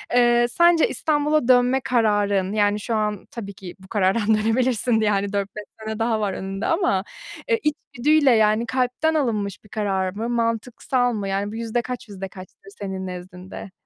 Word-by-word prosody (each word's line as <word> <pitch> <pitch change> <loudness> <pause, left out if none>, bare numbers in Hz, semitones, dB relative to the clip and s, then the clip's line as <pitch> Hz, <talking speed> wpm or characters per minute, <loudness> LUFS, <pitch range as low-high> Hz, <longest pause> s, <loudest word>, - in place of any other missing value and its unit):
Eee, 240 0 +4
sence 340 +1 +4
İstanbul'a 300 -3 +1
dönme 250 +1 +4
kararın, 205 -5 +1
yani, 205 -1 +2
şu 225 +2 -2
an 210 -2 -1
tabii 200 -4 -7
ki 185 -2 -10
bu 190 - -15
karardan 205 +1 +1
dönebilirsin 225 +1 +1
yani 205 -1 0
4-5 200 +1 -3 0.2
sene 220 0 -5
daha 225 -1 +1
var 205 -3 -1
önünde 195 +2 -4
ama, 330 - +1 0.5
eee, 460 -1 +3
içgüdüyle 290 0 +2
yani 220 0 +3
kalpten 255 +6 0
alınmış 210 - -1
bir 210 - -19
karar 195 -3 -1
mı? 225 +4 -3
Mantıksal 240 +2 0
mı? 205 -3 -3
Yani, 200 +1 -2
bu - - -7
yüzde 230 +1 -1
kaç, 245 -2 -7
yüzde 195 -1 -6
kaçtır 185 +1 -13
senin 190 -2 -4
nezdinde? 180 +1 -9
220 Hz, 165 wpm, -23 LUFS, 200-245 Hz, 0.5 s, Eee